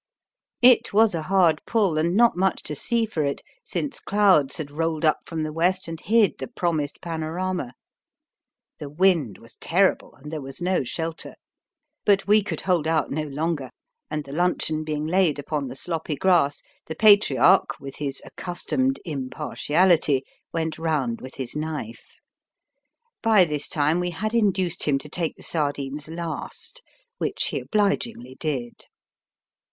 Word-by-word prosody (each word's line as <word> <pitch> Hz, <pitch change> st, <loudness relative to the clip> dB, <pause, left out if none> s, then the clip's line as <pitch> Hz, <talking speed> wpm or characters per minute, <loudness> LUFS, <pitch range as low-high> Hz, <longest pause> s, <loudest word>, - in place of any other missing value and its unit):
It 240 Hz, -3 st, +6 dB
was 220 Hz, 0 st, +5 dB
a 165 Hz, -, -2 dB
hard 170 Hz, -2 st, +3 dB
pull 200 Hz, -8 st, +2 dB
and 170 Hz, +3 st, +1 dB
not 235 Hz, -1 st, +5 dB
much 190 Hz, 0 st, 0 dB
to 150 Hz, -, -5 dB
see 230 Hz, +10 st, 0 dB
for 170 Hz, -8 st, -2 dB
it, 140 Hz, -1 st, -2 dB, 0.2 s
since 360 Hz, -10 st, -3 dB
clouds 195 Hz, -9 st, +3 dB
had 145 Hz, -3 st, -5 dB
rolled 160 Hz, +1 st, -1 dB
up 155 Hz, -, +3 dB
from 160 Hz, -2 st, -3 dB
the 155 Hz, 0 st, -4 dB
west 180 Hz, +3 st, +1 dB
and 165 Hz, 0 st, -6 dB
hid 220 Hz, -2 st, +3 dB
the -, -, -4 dB
promised 165 Hz, -, -2 dB
panorama. 165 Hz, -3 st, -3 dB, 1.1 s
The 145 Hz, -, -6 dB
wind 155 Hz, -, +2 dB
was 115 Hz, +1 st, -16 dB
terrible, 190 Hz, +3 st, +1 dB
and 150 Hz, +3 st, -11 dB
there 155 Hz, -2 st, -4 dB
was 135 Hz, 0 st, -8 dB
no 180 Hz, -3 st, +1 dB
shelter. 165 Hz, +5 st, -5 dB, 0.7 s
But 200 Hz, -1 st, +3 dB
we 210 Hz, +1 st, +5 dB
could 205 Hz, -, -4 dB
hold 180 Hz, -5 st, +1 dB
out 160 Hz, -2 st, +1 dB
no 155 Hz, -, -1 dB
longer, 145 Hz, -1 st, -2 dB, 0.4 s
and 150 Hz, -1 st, -3 dB
the 140 Hz, -, -11 dB
luncheon 160 Hz, -1 st, 0 dB
being 155 Hz, -1 st, -3 dB
laid 170 Hz, -2 st, +2 dB
upon 145 Hz, -1 st, -3 dB
the 125 Hz, -, -7 dB
sloppy 160 Hz, 0 st, -3 dB
grass, 165 Hz, -3 st, +2 dB, 0.2 s
the 160 Hz, -, -5 dB
Patriarch, 205 Hz, -3 st, +5 dB
with 135 Hz, -1 st, -9 dB
his 140 Hz, -2 st, -4 dB
accustomed 260 Hz, +9 st, -2 dB
impartiality, 150 Hz, +1 st, +1 dB, 0.3 s
went 160 Hz, -1 st, -2 dB
round 150 Hz, -8 st, -1 dB
with 130 Hz, -, -9 dB
his 130 Hz, -1 st, -5 dB
knife. 150 Hz, -7 st, -5 dB, 1.1 s
By 215 Hz, -5 st, +5 dB
this 150 Hz, -3 st, -3 dB
time 155 Hz, +1 st, +1 dB
we 180 Hz, 0 st, -1 dB
had 215 Hz, +6 st, -3 dB
induced 190 Hz, -6 st, +1 dB
him 145 Hz, -2 st, +2 dB
to 135 Hz, +2 st, -9 dB
take 165 Hz, 0 st, -2 dB
the -, -, -13 dB
sardines 145 Hz, -2 st, -2 dB
last, 170 Hz, -, -6 dB, 0.4 s
which -, -, -1 dB
he -, -, -2 dB
obligingly 205 Hz, -, -1 dB
did. 130 Hz, -7 st, -4 dB
160 Hz, 155 wpm, -24 LUFS, 145-185 Hz, 1.1 s, It